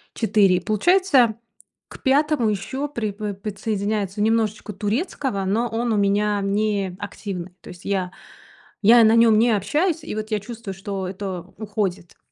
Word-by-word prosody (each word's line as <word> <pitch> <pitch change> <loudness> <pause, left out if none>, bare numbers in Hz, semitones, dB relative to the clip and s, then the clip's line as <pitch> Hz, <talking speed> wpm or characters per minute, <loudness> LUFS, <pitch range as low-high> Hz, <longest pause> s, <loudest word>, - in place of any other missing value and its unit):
4 205 -4 +3
и - - 0
получается 255 - +3 0.5
к - - -13
5 280 -4 +2
еще 260 +8 -3
припо 210 -5 -4
подсоединяется 205 0 -3
немножечко 215 -1 0
турецкого, 210 - -2
но 230 +5 +1
он 230 +1 -2
у - - +1
меня 205 +1 +1
неактивный. 195 -2 -3
То - - -12
есть 180 0 -13
я 190 -2 -1 0.7
я 230 +2 +7
на 220 +1 +5
нем 230 -2 +5
не 235 0 +4
общаюсь 310 - 0
и - - -5
вот 215 +1 -5
я 210 - +1
чувствую, 220 -2 -7
что 195 -1 -4
это 185 -2 -5 0.2
уходит. 200 -5 -3
210 Hz, 145 wpm, -22 LUFS, 195-230 Hz, 0.7 s, я